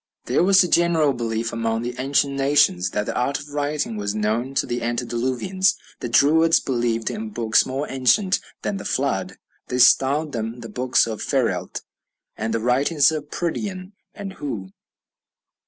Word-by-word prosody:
There - - +2
was 195 +1 +6
a - - -1
general 165 -4 +3
belief 115 -1 -3
among 115 0 -1
the 120 +1 -3
ancient 140 +1 +1
nations 135 -10 +2
that 105 +2 -2
the - - -4
art 130 +3 0
of 145 - -11
writing 145 -5 -2
was 100 0 -3
known 110 +5 -1
to - - +1
the 120 0 -3
antediluvians. 125 +11 0 0.2
The 120 - -4
Druids 160 +6 +4
believed 120 -3 -1
in 220 +1 -5
books 110 - +2
more 135 +3 -3
ancient 185 - +2 0.2
than 200 - -2
the - - -7
Flood. - - -2 0.3
They 125 - -2
styled 140 +4 +4
them 115 0 -4
"the 115 - -8
books 125 +4 +2
of 110 -2 -5
Pheryllt," - - -1 0.5
and 110 +1 -3
"the 115 - 0
writings 140 +6 +3
of 150 -2 -5
Pridian 185 +3 -4 0.3
or 205 - -7
Hu." 140 - -6
130 Hz, 165 wpm, -22 LUFS, 115-155 Hz, 0.5 s, was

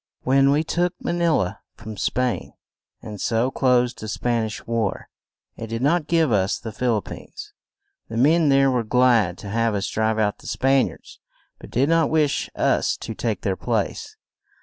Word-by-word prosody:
When 135 +1 +4
we 145 +3 +2
took 175 +2 -1
Ma - - -3
ni 170 0 +1
la 100 - 0 0.2
from 110 0 -9
Spain, 125 +4 -1 0.5
and 105 -3 -8
so 115 +3 +1
closed 125 -2 +1
the 110 - -6
Span 115 +1 -1
ish 110 - -8
war, 115 -4 -2 0.5
it 115 - -7
did 115 +2 -4
not 155 +2 +2
give 165 -4 +2
us 100 -2 +1
the 110 - -7
Phil 120 +1 0
ip 105 - -4
pines. - - -10 0.6
The 115 - -5
men 155 +5 +4
there 135 0 +4
were 125 -2 +1
glad 115 -6 +3
to 100 - -8
have 115 0 0
us 100 0 -1
drive 110 0 0
out 105 -2 0
the - - -13
Span 135 0 +2
iards, - - -13 0.4
but - - -12
did 130 +4 +1
not 165 -1 +3
wish 155 -3 +1
us - - +1
to - - -6
take - - -3
their - - -1
place. 435 - -3
125 Hz, 190 wpm, -23 LUFS, 110-140 Hz, 0.6 s, When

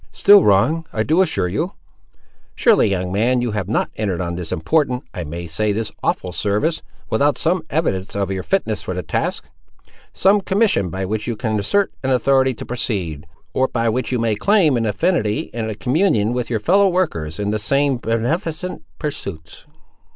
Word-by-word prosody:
"Still 200 -1 +6
wrong, 150 +12 +3
I 110 - 0
do 160 +9 +3
assure 180 - +1
you." 90 - -2 0.8
"Surely, - - +4
young 90 -2 -2
man, 120 +6 +2
you 120 - -1
have 105 -3 -3
not 115 - 0
entered 100 -5 -1
on 85 -2 -2
this 85 -1 -5
important—I 125 - -1
may 85 +3 -6
say, 105 +6 0
this 110 +1 -2
awful 90 - -1
service, 105 - 0 0.3
without 140 +4 +2
some 175 +2 +1
evidence 100 - -1
of 100 -1 -1
your 95 -1 -2
fitness 115 - -1
for 90 - -5
the 90 - -3
task! 80 - -2 0.6
Some 200 +2 +3
commission 195 - +1
by 95 +3 -3
which 105 +2 -3
you 120 - -1
can 110 0 -1
assert 200 - +1
an 130 - -2
authority 130 0 +3
to - - -8
proceed, 90 - -3 0.3
or 130 - +2
by 115 -2 0
which 125 +3 -2
you 125 - +1
may 115 -1 +1
claim 165 - +3
an 115 -2 0
affinity 105 - 0
and 110 -1 -3
a 110 - -4
communion 120 - +1
with 125 -1 -2
your 115 -2 0
fellow 195 - +4
workers 85 - -1
in 105 0 -1
the 110 - -1
same 140 +4 +1
beneficent 155 - -2 0.2
pursuits!" 100 - -6
115 Hz, 180 wpm, -20 LUFS, 100-150 Hz, 0.8 s, Still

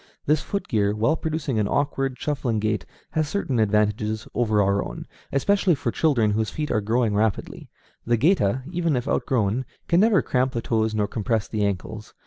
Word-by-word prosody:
This 150 +1 +2
foot 200 - -4
gear, 105 -2 +1
while 115 +9 +2
producing 155 -7 -2
an 105 - +1
awkward, 135 -1 -1
shuffling 135 -6 -1
gait, 110 -2 -1 0.2
has 155 -1 0
certain 145 - -1
advantages 105 +1 +1
over 110 -3 +1
our 100 0 +2
own, - - -7 0.3
especially 190 +5 +2
for 120 -3 -2
children 120 -9 +2
whose 110 +1 0
feet 150 -1 -3
are 110 - +1
growing 110 +1 +1
rapidly. 105 0 -1 0.4
The 120 0 +3
géta, 130 - +2
even 170 -4 0
if 125 +2 -2
outgrown, 120 -2 0 0.2
can 170 - +3
never 205 - +4
cramp 130 0 0
the 115 - -2
toes 110 -1 0
nor 105 -1 +1
compress 110 0 -1
the 105 -2 -2
ankles. 100 +2 -4
115 Hz, 180 wpm, -24 LUFS, 105-145 Hz, 0.4 s, never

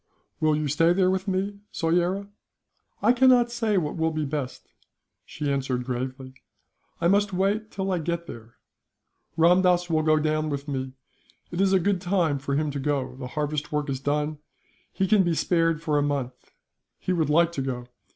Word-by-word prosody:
"Will 155 -1 +3
you 150 0 -1
stay 165 +4 +3
there 185 0 +3
with 190 +1 -2
me, 195 +1 -2
Soyera?" 175 +4 0 0.8
"I 235 +4 +5
cannot 250 -1 +5
say 225 -3 0
what 155 -3 -1
will 160 0 +1
be 155 -1 -2
best," 140 -2 -5 0.6
she 145 -1 -3
answered, 130 -2 -1
gravely; 130 +1 -4 0.7
"I 170 - +2
must 200 +1 +2
wait 200 +4 0
till 195 -1 -3
I 180 - 0
get 170 +1 -3
there. 115 -7 -11 0.8
Ramdass 175 +1 +4
will 160 -1 +3
go 155 0 +3
down 155 0 0
with 140 0 -4
me. 130 -2 -3 0.6
It 175 +2 -1
is 195 -1 +3
a 190 - +4
good 190 0 0
time 175 -6 +1
for 140 +1 -2
him 150 0 0
to 140 - -4
go. 135 -2 -1
The 130 -2 -6
harvest 150 0 -2
work 150 -1 -1
is 135 - -3
done, 150 +2 -1 0.5
he 190 - 0
can 205 +1 +5
be 175 -3 +1
spared 165 -1 +1
for 150 -2 +1
a - - +2
month. 140 -3 -3 0.4
He 185 - -2
would 160 -4 0
like 170 +2 +4
to 145 - -3
go. 125 -2 -4
160 Hz, 185 wpm, -25 LUFS, 145-185 Hz, 0.8 s, I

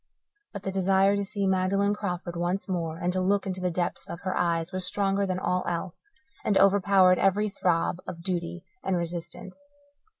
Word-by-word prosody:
But 200 -2 -7
the 195 - -2
desire 195 +1 +3
to 200 - 0
see 200 0 -2
Magdalen 195 +2 +2
Crawford 180 -4 -4
once 175 +3 -1
more 165 -4 -2
and 180 +1 -1
to 185 - 0
look 200 +2 +1
into 185 -1 -3
the 180 - +1
depths 175 0 -3
of 170 - -6
her 185 -1 -2
eyes 170 -1 0
was 185 -1 -3
stronger 195 +1 0
than 185 -1 -1
all 180 0 0
else, 175 - -4 0.3
and 200 - +2
overpowered 195 -2 +5
every 205 +2 +2
throb 180 -4 0
of 170 -1 -7
duty 175 -1 -3 0.2
and 190 -2 0
resistance. 170 +2 -5
185 Hz, 180 wpm, -27 LUFS, 175-195 Hz, 0.3 s, overpowered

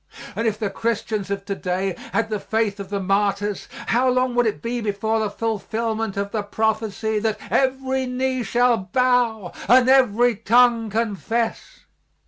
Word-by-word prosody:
And 225 - 0
if 215 -1 0
the 210 -3 -2
Christians 220 -2 -2
of 200 0 -3
to 200 - -2
day 185 0 -2 0.2
had 225 -1 0
the 210 - -1
faith 215 -1 -1
of 195 -1 -7
the 200 0 -2
martyrs, 200 +1 0 0.2
how 255 +2 +2
long 255 0 +1
would 240 -1 +2
it 215 - -2
be 240 +1 -3
before 220 +1 -1
the 215 -1 0
fulfilment 225 0 -2
of 200 0 -2
the 215 - -1
prophecy 220 +1 -1
that 220 0 -1
"every 265 0 +1
knee 255 0 -1
shall 240 +2 +2
bow 225 -1 +1
and 250 +1 +6
every 245 -3 +4
tongue 230 +1 +3
confess?" 225 +1 -2
225 Hz, 160 wpm, -22 LUFS, 205-245 Hz, 0.2 s, and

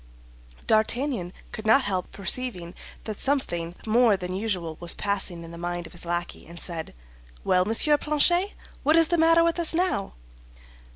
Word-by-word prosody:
D'Artagnan 220 -3 +1 0.2
could 220 0 -6
not 260 +5 +5
help 185 -4 -3
perceiving 195 -3 -1 0.3
that 215 -2 -6
something 175 -12 -1
more 225 -1 +4
than 180 -1 -5
usual 185 -5 -3
was 175 -1 +1
passing 195 -4 -3
in 165 - -10
the 170 - -10
mind 175 0 -4
of - - -11
his 175 - -4
lackey 175 -1 -4
and 170 +1 -10
said, 165 - -6 0.5
"Well, 180 0 +3
Monsieur 290 +8 +3
Planchet, 345 +6 +2 0.3
what 305 +3 +3
is 330 -1 +5
the 345 -1 +1
matter 330 +1 +5
with 335 +1 0
us 335 -1 +3
now?" 345 - -1
205 Hz, 165 wpm, -25 LUFS, 175-285 Hz, 0.5 s, not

